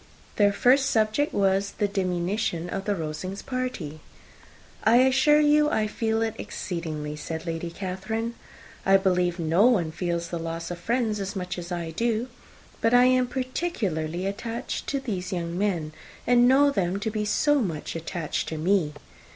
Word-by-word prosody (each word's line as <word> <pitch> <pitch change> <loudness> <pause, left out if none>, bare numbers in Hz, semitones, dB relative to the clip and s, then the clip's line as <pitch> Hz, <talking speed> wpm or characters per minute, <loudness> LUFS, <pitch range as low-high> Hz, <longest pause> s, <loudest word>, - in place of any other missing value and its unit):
Their 205 -1 +5
first 265 +6 +4
subject 220 +6 +1
was 195 0 +1
the 205 - +2
diminution 180 -2 -1
of 195 0 -3
the 205 - +1
Rosings' 175 +4 -5
party. 255 - -4 0.8
"I 225 - +5
assure 265 +4 +5
you, 300 0 +4
I 220 -7 +1
feel 220 +1 0
it 225 -1 -1
exceedingly," 155 -4 -4
said 160 +2 -5
Lady 165 0 -3
Catherine; 200 +6 -4 0.5
"I 195 0 +6
believe 180 -2 +1
nobody 175 +2 +3
feels 170 0 -2
the 170 - -3
loss 165 +1 -4
of 175 - -5
friends 225 +1 0
so 200 - -6
much 180 -1 -4
as 175 +1 -8
I 170 -2 -3
do. 230 +6 -1 0.5
But 230 +2 +4
I 245 0 +7
am 255 0 +3
particularly 205 - -2
attached 230 +5 -4
to 275 - -1
these 200 -9 -4
young 170 -2 -3
men; 175 -6 -1 0.3
and 245 0 +5
know 280 +2 +5
them 190 -5 0
to 220 +2 -2
be 210 0 -1
so 290 +7 +2
much 165 -9 -3
attached 165 -1 -3
to 160 - -4
me! 165 -2 +1
195 Hz, 160 wpm, -26 LUFS, 170-235 Hz, 0.8 s, I